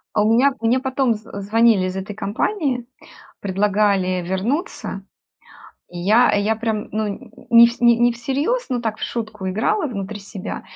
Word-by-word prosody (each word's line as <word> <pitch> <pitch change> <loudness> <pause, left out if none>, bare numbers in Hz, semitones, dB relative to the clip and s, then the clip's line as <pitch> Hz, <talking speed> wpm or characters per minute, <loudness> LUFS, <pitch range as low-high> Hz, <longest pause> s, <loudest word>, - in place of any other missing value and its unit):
А 210 - +3
у 220 - +2
меня 270 +3 +4
мне 235 +3 +2
потом 265 -2 0
з 215 +1 -10
звонили 215 -2 +3
из 185 - -5
этой 195 +2 -6
компании, 245 - -2 0.6
предлагали 195 -2 +1
вернуться. 225 - -3 0.8
И 175 - -9
я 215 +7 +4
я 205 +2 +1
прям, 220 -1 -3
ну, 215 0 -1 0.4
не 235 0 +9
в 235 +1 -5
не 240 0 +4
всерьез, 280 - -1
но 245 -2 -1
так 220 -2 -3
в - - -12
шутку 215 -5 -4
играла 225 - 0
внутри 205 -2 -5
себя. 195 -1 -7
220 Hz, 155 wpm, -21 LUFS, 200-245 Hz, 0.8 s, не